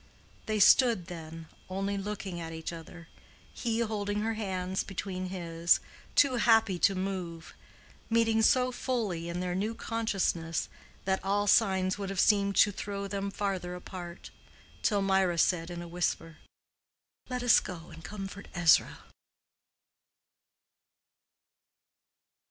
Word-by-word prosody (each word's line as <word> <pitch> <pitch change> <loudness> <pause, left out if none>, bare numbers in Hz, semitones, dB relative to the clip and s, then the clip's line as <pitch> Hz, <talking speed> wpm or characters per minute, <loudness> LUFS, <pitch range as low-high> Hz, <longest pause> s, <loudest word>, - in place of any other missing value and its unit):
They 215 -1 0
stood 225 -2 +6
then, 165 -2 -9 0.2
only 195 +2 -2
looking 195 -3 -4
at 165 0 -6
each 160 +1 -5
other, 165 0 -10 0.5
he 230 -1 -1
holding 210 -2 -1
her 225 +1 0
hands 190 -3 -2
between 185 -1 -4
his—too 175 - +1
happy 225 -5 +4
to 195 +2 +4
move, 185 -3 -4 0.6
meeting 225 -1 +3
so 255 +3 +4
fully 215 -10 -2
in 175 +1 -3
their 180 -1 -2
new 210 +5 -2
consciousness 195 -9 -1 0.4
that 190 0 0
all 200 +1 +1
signs 190 -2 +3
would 195 -1 -3
have 195 -2 -3
seemed 200 -1 +3
to 205 - +5
throw 200 0 -5
them 200 0 -3
farther 195 -3 -3
apart, 180 -1 -9 0.5
till 205 -2 +2
Mirah 190 -3 +2
said 165 0 +2
in 175 0 -6
a - - -8
whisper: 165 -2 -2 0.9
"Let 250 -1 -3
us 245 - +6
go 170 -2 -8
and 165 +1 -12
comfort 200 +2 -7
Ezra." 170 -3 +4
195 Hz, 125 wpm, -30 LUFS, 175-210 Hz, 0.9 s, stood